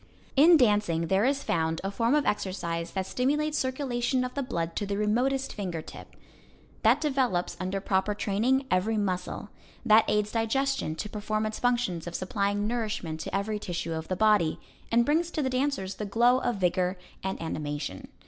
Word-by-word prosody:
In 320 +5 +8
dancing 205 - +2
there 195 +3 +3
is 275 +1 +1
found 160 -1 0
a 195 - -2
form 230 +6 +2
of 300 - +2
exercise 170 -4 -2
that 190 -1 -1
stimulates 295 +8 0
circulation 260 -1 0
of 250 - -4
the 280 - -2
blood 170 -10 -3
to 205 - -2
the 200 0 -2
remotest 250 +6 +1
finger 175 -6 -4
tip; - - -12 0.7
that 235 +5 +4
develops, 265 - 0
under 185 +2 -2
proper 195 +1 0
training, 235 +7 +1
every 195 +5 +2
muscle; 185 0 -2 0.4
that 220 -1 +6
aids 210 0 +1
digestion 230 - 0
to 210 - -4
perform 215 +1 -2
its 215 0 -4
functions 240 -9 0
of 170 - -5
supplying 200 +2 -1
nourishment 215 -8 -2
to - - -4
every 210 +2 -1
tissue 170 -4 -3
of 160 0 -4
the 185 - -1
body, 210 -5 +3 0.3
and 235 +1 +4
brings 320 +4 +2
to 310 -3 -2
the 260 - -1
dancers 255 -8 -1
the 210 - -5
glow 240 +5 +3
of 245 -2 -1
vigor 180 0 0 0.2
and 190 0 -3
animation. 145 - -4
210 Hz, 175 wpm, -28 LUFS, 185-250 Hz, 0.7 s, In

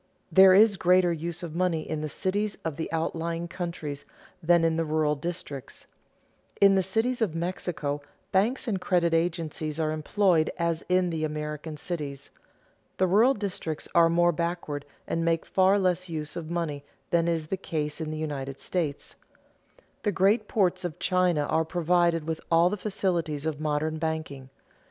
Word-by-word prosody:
There 190 -1 +8
is 205 0 +6
greater 180 0 +4
use 170 +2 -4
of 165 -3 -6
money 170 -2 0
in 155 -1 -3
the 155 - -3
cities 205 +6 -1
of 160 -3 -2
the 160 - -4
outlying 165 +1 -2
countries 170 -5 -5 0.4
than 170 +1 +4
in 165 -1 +2
the 165 - +1
rural 155 -1 +1
districts. 150 -3 -6 0.7
In 200 -1 +7
the 190 - +4
cities 225 +7 0
of 190 -8 0
Mexico 165 -4 -3 0.3
banks 225 +8 +1
and 195 -5 -1
credit 175 -2 +2
agencies 165 -2 -1
are 155 -1 +1
employed 160 +1 +2
as 170 -2 -1
in 180 -1 +2
the 160 -1 -2
American 150 0 -4
cities. 145 -4 -5 0.7
The 185 - +3
rural 220 +9 +4
districts 185 -6 -4
are 170 -1 +6
more 175 +1 +4
backward 170 -3 -3 0.2
and 165 - -1
make 165 -1 +1
far 190 +1 +3
less 185 -2 0
use 150 -2 -5
of 165 -2 -5
money 165 -5 -3 0.3
than 170 -1 +3
is 165 -2 0
the - - 0
case 155 -4 -4
in 155 - -3
the 155 - -4
United 140 -3 -4
States. 160 -6 -3 0.9
The 210 - +1
great 200 +4 +2
ports 185 -3 +1
of 175 -4 -4
China 180 -4 +2
are 160 +2 +1
provided 170 -1 +1
with 160 -1 -3
all 170 +2 +4
the - - 0
facilities 180 -7 -2
of 155 -2 -2
modern 155 +1 -1
banking. 155 -4 -4
170 Hz, 165 wpm, -27 LUFS, 155-185 Hz, 0.9 s, There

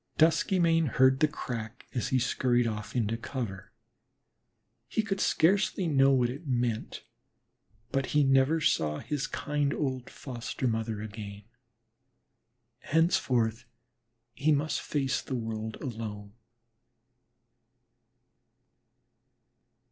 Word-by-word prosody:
Duskymane 165 0 +3
heard 130 +1 +4
the 155 - +5
"crack" 120 -5 -6
as 125 - -1
he 130 - +2
scurried 125 -1 +2
off 105 -1 -4
into 115 -2 +1
cover. 115 -6 -5 1.2
He 220 - 0
could 195 -2 -2
scarcely 190 +2 +2
know 135 -4 +4
what 125 -3 +3
it 145 +5 -9
meant, 120 -3 -1 0.9
but 135 -1 0
he 150 0 +3
never 135 +4 +4
saw 75 - +1
his 145 - -3
kind 145 -1 -1
old 130 -4 -2
foster 125 0 -4
mother 110 -2 -2
again. 105 -1 -8 1.5
Thenceforth 125 -9 +2 0.7
he 145 +6 +1
must 145 0 +1
face 135 -3 -1
the 130 - -4
world 110 -2 -4
alone. 105 -5 -6
130 Hz, 100 wpm, -29 LUFS, 115-150 Hz, 1.5 s, the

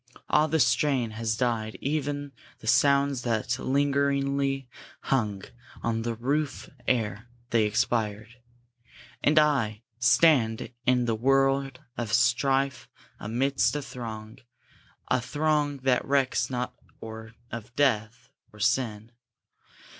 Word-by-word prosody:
Ah, 150 +1 +4
the 160 0 +1
strain 135 -7 +2
Has 110 0 -2
died 115 -3 -1
ev'n 145 -1 -2 0.3
the - - -14
last 110 - +5
sounds 140 -2 +3
that 120 +1 -1
lingeringly 140 -1 0 0.3
Hung 105 -7 -1 0.4
on 115 -1 0
the 115 0 -2
roof 140 +4 -2 0.2
ere 110 -2 0 0.2
they 115 -2 +3
expired! 110 +1 -1 0.9
And 150 +2 +3
I, 125 -8 +2 0.2
Stand 125 -3 +3 0.2
in 125 -1 +3
the 115 - +1
world 135 +3 +1 0.2
of 115 -3 -3
strife, 135 +2 +2 0.3
amidst 130 +7 0
a 145 - -1
throng, 110 -2 -8 0.7
A 130 - +2
throng 150 +1 0
that 130 -2 +2
recks 135 -1 +1
not 125 -1 -3 0.3
or 110 0 -9 0.2
of 115 -1 -7
death, 115 -4 0 0.2
or 105 - -16
sin! 115 -1 0
125 Hz, 115 wpm, -27 LUFS, 115-140 Hz, 0.9 s, last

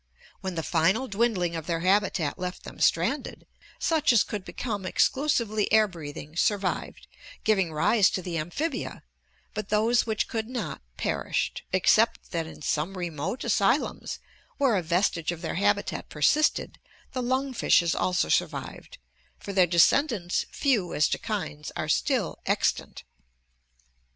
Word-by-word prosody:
When 190 -1 -4
the 165 - -2
final 190 +13 +2
dwindling 200 -6 0
of 165 0 -5
their 165 -2 -1
habitat 190 -4 +1
left 180 0 -5
them - - -10
stranded, - - 0 0.3
such 315 -4 +2
as 235 -4 +5
could 205 -3 -5
become 210 -1 -4
exclusively 220 0 +1
air 215 0 +5
breathing 155 -3 -9
survived, 195 +1 -1 0.4
giving 195 -6 +2
rise 190 +6 +4
to 185 - -6
the 175 -1 -4
amphibia, 265 - -3 0.5
but 210 -1 -5
those 225 +3 +2
which 220 -1 0
could 220 0 -3
not, 220 - -4 0.2
perished, - - -1
except - - +3
that 165 -1 -2
in 155 - -11
some 165 +7 -1
remote 175 - -3
asylums - - +1 0.4
where 265 -6 +3
a 190 - +1
vestige 170 -1 0
of 175 0 -7
their - - -2
habitat 205 +2 0
persisted 295 - +1 0.3
the 255 - -3
lung 260 +2 -1
fishes 170 -7 +3
also 180 0 +1
survived, - - -2 0.4
for 200 - -7
their 185 -2 +5
descendants, 180 - +3
few 230 - 0
as 150 - +4
to - - -1
kinds, 75 0 -4
are - - -3
still - - 0
extant. - - 0
195 Hz, 140 wpm, -27 LUFS, 170-225 Hz, 0.5 s, as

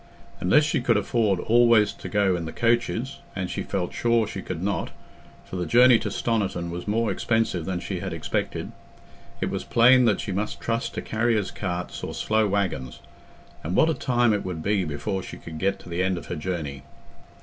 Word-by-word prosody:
Unless 120 +12 +4
she 150 -4 0
could 120 -2 +3
afford 105 -2 +1
always 115 -2 +4
to - - -8
go 100 -3 +2
in 85 -2 -3
the 80 - -5
coaches—and 120 -4 -1
she - - -3
felt 95 -3 -3
sure 115 -1 +2
she 95 - -6
could 90 -2 -5
not, 100 0 -1 0.6
for 95 - -6
the 90 - -2
journey 125 0 +6
to - - -3
Stoniton 95 -7 -1
was 90 +3 -6
more 115 +2 +1
expensive 110 -8 0
than 95 -2 -2
she 90 +1 -4
had 95 +1 -4
expected—it 80 -2 -5
was - - -3
plain 125 +2 +5
that 110 -4 +2
she - - -4
must 100 +3 -3
trust 115 0 -2
to - - -3
carriers' 110 -2 0
carts 90 -3 -4
or - - -4
slow 110 0 +1
waggons; 95 -11 -2 0.6
and 85 +4 -2
what 160 0 +4
a - - +1
time 120 -5 +2
it 105 - -1
would 85 -4 -5
be 100 -1 +1
before 95 +6 -3
she - - -9
could 80 -1 -9
get 100 +3 +1
to - - -15
the 85 +1 -2
end 95 -1 +1
of 85 - -7
her - - -4
journey! 75 -5 -4
100 Hz, 195 wpm, -25 LUFS, 90-115 Hz, 0.6 s, journey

